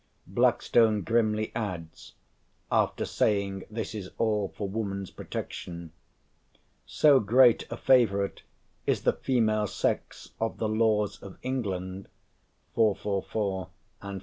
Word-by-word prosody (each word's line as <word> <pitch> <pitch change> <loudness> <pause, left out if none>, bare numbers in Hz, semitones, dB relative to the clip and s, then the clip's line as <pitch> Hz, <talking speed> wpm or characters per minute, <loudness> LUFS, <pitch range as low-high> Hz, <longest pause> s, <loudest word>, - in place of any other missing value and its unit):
Blackstone 110 -4 +3
grimly 110 -2 +1
adds, 90 -8 -6 0.6
after - - +1
saying 100 -2 0
this 110 0 -4
is 100 -4 -6
all 105 -3 0
for 100 - -2
woman's 100 -2 -4
protection: 85 -2 -7 1.0
"So 145 -3 +5
great 120 +3 +4
a 115 - -4
favourite 100 -8 +3 0.5
is - - +1
the - - +3
female 110 -4 +1
sex - - -3
of 115 - -1
the 110 - -1
laws 110 -1 +1
of 100 - -10
England" 95 -7 -3 0.7
(444 105 -3 +1 0.5
and 100 +4 -36
445). 100 - -7
105 Hz, 115 wpm, -28 LUFS, 100-115 Hz, 1.0 s, So